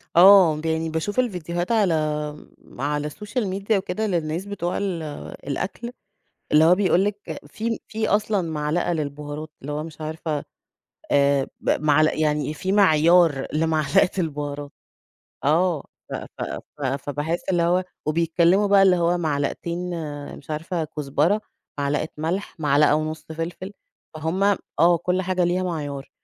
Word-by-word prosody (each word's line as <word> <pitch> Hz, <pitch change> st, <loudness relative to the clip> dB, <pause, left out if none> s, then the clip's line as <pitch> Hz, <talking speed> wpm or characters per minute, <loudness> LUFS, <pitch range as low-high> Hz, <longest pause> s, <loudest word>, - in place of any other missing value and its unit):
آه، 185 Hz, -2 st, +8 dB
ب -, -, -9 dB
يعني 160 Hz, 0 st, 0 dB
باشوف 160 Hz, +9 st, -2 dB
الفيديوهات 175 Hz, -4 st, -1 dB
على 205 Hz, -7 st, +3 dB, 0.9 s
على 150 Hz, +2 st, -1 dB
الsocial 210 Hz, -, -4 dB
media 195 Hz, +2 st, -4 dB
وكده، 195 Hz, +3 st, -2 dB
للناس 170 Hz, 0 st, -1 dB
بتوع 180 Hz, -4 st, -3 dB
ال 190 Hz, -5 st, -2 dB, 0.5 s
الأكل 200 Hz, -, -3 dB, 0.6 s
اللي 150 Hz, +1 st, +6 dB
هو 175 Hz, +2 st, +6 dB
بيقول 190 Hz, -1 st, +3 dB
لِك 205 Hz, 0 st, -2 dB, 0.3 s
في 225 Hz, +8 st, -3 dB
في 220 Hz, 0 st, -2 dB
أصلًا 210 Hz, -1 st, +1 dB
معلقة 155 Hz, +3 st, 0 dB
للبهارات، 150 Hz, 0 st, -5 dB
اللي 145 Hz, +2 st, -5 dB
هو 150 Hz, +1 st, -3 dB
مش 160 Hz, -1 st, -10 dB
عارفة 155 Hz, -1 st, -3 dB, 0.7 s
آآ 140 Hz, -1 st, +3 dB
ب -, -, -3 dB
معل 155 Hz, +1 st, +4 dB
يعني 150 Hz, -1 st, 0 dB
في 185 Hz, +5 st, -3 dB
معيار 170 Hz, -6 st, +5 dB
لمعلقة 155 Hz, +2 st, +2 dB
البهارات. 145 Hz, -4 st, -3 dB, 0.7 s
آه، 165 Hz, +1 st, +2 dB, 0.3 s
ف -, -, -4 dB
ف -, -, -7 dB, 0.4 s
ف -, -, -6 dB
فباحس 145 Hz, +5 st, -2 dB
اللي 175 Hz, -2 st, +2 dB
هو 180 Hz, +2 st, +2 dB, 0.2 s
وبيتكلموا 170 Hz, +5 st, +3 dB
بقى، 200 Hz, -1 st, +5 dB
اللي 185 Hz, -2 st, +5 dB
هو 175 Hz, +1 st, +2 dB
معلقتين 160 Hz, +2 st, -2 dB, 0.6 s
مش 150 Hz, -, -14 dB
عارفة 160 Hz, +2 st, -2 dB
كزبرة، 150 Hz, +8 st, +1 dB, 0.4 s
معلقة 145 Hz, +2 st, 0 dB
ملح، 165 Hz, +6 st, -3 dB
معلقة 145 Hz, 0 st, +4 dB
ونُص 155 Hz, +1 st, -2 dB
فلفل. 175 Hz, +4 st, -5 dB, 0.4 s
فهُم 160 Hz, +5 st, -2 dB, 0.4 s
آه، 170 Hz, +1 st, +6 dB
كل 180 Hz, +2 st, 0 dB
حاجة 185 Hz, -1 st, +1 dB
ليها 180 Hz, +2 st, +1 dB
معيار. 145 Hz, -6 st, -4 dB
165 Hz, 140 wpm, -23 LUFS, 150-185 Hz, 0.9 s, آه